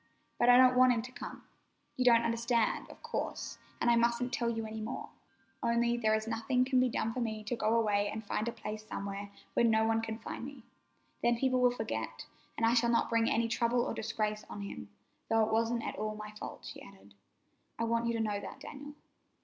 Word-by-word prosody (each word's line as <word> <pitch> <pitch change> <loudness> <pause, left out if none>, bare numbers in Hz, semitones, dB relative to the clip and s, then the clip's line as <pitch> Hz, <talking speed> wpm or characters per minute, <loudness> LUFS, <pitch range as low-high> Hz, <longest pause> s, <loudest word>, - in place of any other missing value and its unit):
But 240 - +4
I 245 - +9
don't 255 0 +7
want 255 0 +6
him 225 -2 -1
to 250 - -9
come. - - -8 0.5
You 255 - +1
don't 235 -1 +6
understand, 230 0 0
of - - -14
course, - - -4 0.2
and - - 0
I - - +5
mustn't 235 +1 +1
tell 235 -1 +1
you 225 -1 -2
any 220 0 -5
more, 220 +3 -5 0.5
only 235 0 +2
there 220 -2 +2
is 220 0 -2
nothing 230 +3 +1
can 260 -1 +3
be 255 0 +3
done 225 - -1
but - - -4
for 255 - -3
me 220 -3 -2
to 215 +3 -2
go 220 0 +1
away 205 -2 +2
and 220 +1 -5
find 215 +2 -1
a - - 0
place 215 -1 -6
somewhere 200 -1 -5 0.2
where - - +3
no 220 -1 +4
one 225 0 +2
can 225 -1 -4
find 225 - -7
me. 270 -2 -8 0.6
Then 240 0 +3
people 255 0 +2
will 250 - +6
forget, 110 - -4 0.3
and 230 - +2
I 230 - +4
shall 235 0 +3
not 235 0 +2
bring 230 0 +3
any 230 +1 +2
trouble 235 +1 +1
or - - -2
disgrace 215 -1 -2
on 205 - -6
him—though 105 - -3
it 220 - -3
wasn't 230 +1 +1
at - - -4
all 215 0 -2
my 215 0 -7
fault," 210 - -8
she - - -8
added. 195 - -15 0.6
"I - - -1
want 230 0 +1
you 235 - +1
to 230 - -1
know 205 -2 -1
that, - - -8
Daniel." 290 +1 -9
230 Hz, 225 wpm, -32 LUFS, 215-240 Hz, 0.6 s, I